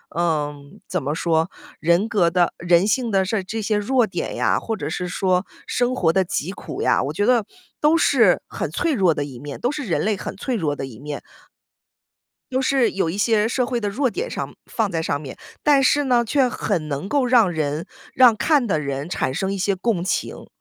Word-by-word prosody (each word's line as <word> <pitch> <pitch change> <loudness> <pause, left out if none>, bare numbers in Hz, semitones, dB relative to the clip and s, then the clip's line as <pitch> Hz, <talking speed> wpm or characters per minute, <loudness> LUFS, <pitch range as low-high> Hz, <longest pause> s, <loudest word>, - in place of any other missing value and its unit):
嗯， 150 -4 -2
怎 180 - -2
么 145 +2 -2
说， 165 +1 +1 0.3
人 170 +6 +2
格 195 -7 +2
的 175 0 +2
人 175 +3 +3
性 245 +1 +1
的 195 -2 +2
事 215 +4 -1
儿 190 - -2
这 215 +4 -4
些 210 0 0
弱 240 +4 +2
点 - - -4
呀， - - +1
或 225 -1 -3
者 145 -5 -4
是 180 +3 -3
说 185 +1 0 0.2
生 245 +1 0
活 165 -8 +2
的 190 - +3
疾 175 -1 -3
苦 200 - -6
呀， - - +3
我 140 - -2
觉 205 +6 0
得 240 -2 +4 0.4
都 305 +2 +4
是 - - +4
很 - - -4
脆 330 -3 0
弱 185 - +3
的 145 - -2
一 130 -4 -9
面， 145 +1 -7
都 245 - 0
是 295 -1 -4
人 180 - 0
类 215 0 +1
很 190 - -7
脆 255 +4 -2
弱 155 -9 -1
的 135 - -4
一 120 -3 -11
面。 145 0 -6 1.3
又 260 +1 +1
是 265 -2 +2
有 190 -4 -1
一 175 - -4
些 215 0 +2
社 250 +1 0
会 240 -1 -2
的 205 -2 -2
弱 255 +6 0
点 445 - -4
上 - - -5
放 220 -4 -1
在 165 -2 -1
上 145 -3 -1
面， 140 -3 -9 0.3
但 290 -2 +5
是 290 +2 +3
呢， 245 -2 +3
却 265 +2 +2
很 190 -9 -2
能 145 +5 -3
够 280 -1 +2
让 240 -7 +4
人 155 0 -2 0.3
让 250 -3 +6
看 280 +2 +2
的 170 -7 +1
人 140 +1 -4
产 130 - -1
生 190 +7 -1
一 - - -3
些 195 +1 0
共 190 -2 -1
情。 185 - -3
195 Hz, 240 characters per minute, -22 LUFS, 160-240 Hz, 1.3 s, 让